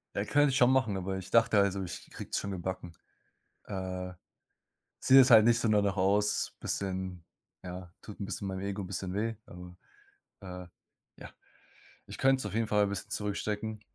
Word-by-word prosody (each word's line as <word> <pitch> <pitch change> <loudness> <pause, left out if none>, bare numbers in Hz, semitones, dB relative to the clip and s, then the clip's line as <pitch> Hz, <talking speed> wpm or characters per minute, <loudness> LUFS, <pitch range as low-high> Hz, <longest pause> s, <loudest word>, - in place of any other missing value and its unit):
Ja, - - 0
könnte 145 0 +3
ich 130 - 0
schon 125 +1 +5
machen, 115 -7 +2
aber 95 0 -3
ich 95 - -8
dachte 115 -2 +4
also, 100 -1 +1
ich 90 0 -8
krieg's - - -5
schon 100 - -5
gebacken. 90 -1 -5 0.7
Äh. 95 -1 -5 0.9
Sieht 135 +1 +7
jetzt 130 0 +7
halt 110 -2 +9
nicht 120 0 +4
so 115 - +1
danach 100 -2 +2
aus, 100 +2 +1
bisschen 95 -3 -3 0.4
ja, 90 -1 -8
tut 105 - -10
'n - - -2
bisschen 100 -1 -4
meinem 95 0 -4
Ego 100 +1 -3
bisschen 90 0 -4
weh, 115 +2 -1
aber, 90 0 -11 0.7
äh, 90 -1 -8 0.5
ja, - - -9 0.8
ich - - -9
könnt's 135 0 +3
auf - - -6
jeden 115 0 +1
Fall 105 -1 +3
'n - - -1
bisschen 100 +2 -5
zurückstecken. 105 +1 -3
100 Hz, 175 wpm, -30 LUFS, 95-110 Hz, 0.9 s, halt